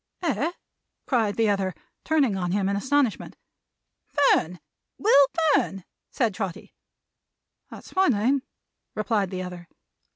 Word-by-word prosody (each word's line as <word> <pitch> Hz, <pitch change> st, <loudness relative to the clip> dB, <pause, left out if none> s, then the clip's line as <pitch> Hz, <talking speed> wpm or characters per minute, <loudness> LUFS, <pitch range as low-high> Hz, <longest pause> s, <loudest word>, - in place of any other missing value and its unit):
"Eh!" 325 Hz, 0 st, 0 dB, 0.5 s
cried 225 Hz, -6 st, +1 dB
the 225 Hz, -1 st, +2 dB
other, 195 Hz, -3 st, 0 dB, 0.3 s
turning 285 Hz, -10 st, +2 dB
on 180 Hz, -2 st, -2 dB
him 195 Hz, 0 st, 0 dB
in 200 Hz, -, 0 dB
astonishment. 260 Hz, +2 st, 0 dB, 0.7 s
"Fern! 180 Hz, -, +2 dB, 0.4 s
Will 285 Hz, -10 st, +5 dB, 0.3 s
Fern!" 195 Hz, -7 st, 0 dB, 0.3 s
said 230 Hz, -6 st, 0 dB
Trotty. 190 Hz, -3 st, -6 dB, 1.0 s
"That's -, -, -12 dB
my 380 Hz, 0 st, +4 dB
name," 255 Hz, +3 st, +2 dB, 0.5 s
replied 210 Hz, -2 st, 0 dB
the 185 Hz, -1 st, -4 dB
other. 180 Hz, -1 st, -8 dB
210 Hz, 120 wpm, -25 LUFS, 190-275 Hz, 1.0 s, Will